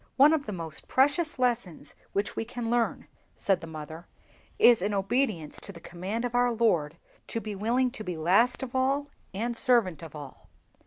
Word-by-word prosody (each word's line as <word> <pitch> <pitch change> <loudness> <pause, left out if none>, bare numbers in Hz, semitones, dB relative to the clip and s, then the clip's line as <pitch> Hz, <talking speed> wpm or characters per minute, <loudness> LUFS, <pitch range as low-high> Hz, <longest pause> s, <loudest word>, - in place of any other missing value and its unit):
"One 285 +4 +7
of 295 -3 -1
the - - -3
most 165 -5 -7
precious 290 +4 +2
lessons 230 - -1 0.2
which 200 +1 -1
we - - -1
can 235 0 -4
learn," 240 -1 0 0.3
said 195 -3 +1
the 165 - -8
mother, 160 +1 -8 0.5
"is, 235 -5 +6
in 205 +2 0
obedience 195 - -1
to - - -5
the 170 - -12
command 185 +8 -4
of 245 - -3
our 245 0 +3
Lord, 175 -10 +1 0.3
to 230 - -3
be 215 -2 -6
willing 240 +6 +1
to 215 - -7
be 180 -4 -4
last 195 +12 +3
of 245 - -6
all, 275 +2 +1 0.2
and 235 +5 -2
servant 230 - +3
of 160 -2 -10
all. 145 -3 -11
220 Hz, 190 wpm, -28 LUFS, 175-245 Hz, 0.5 s, One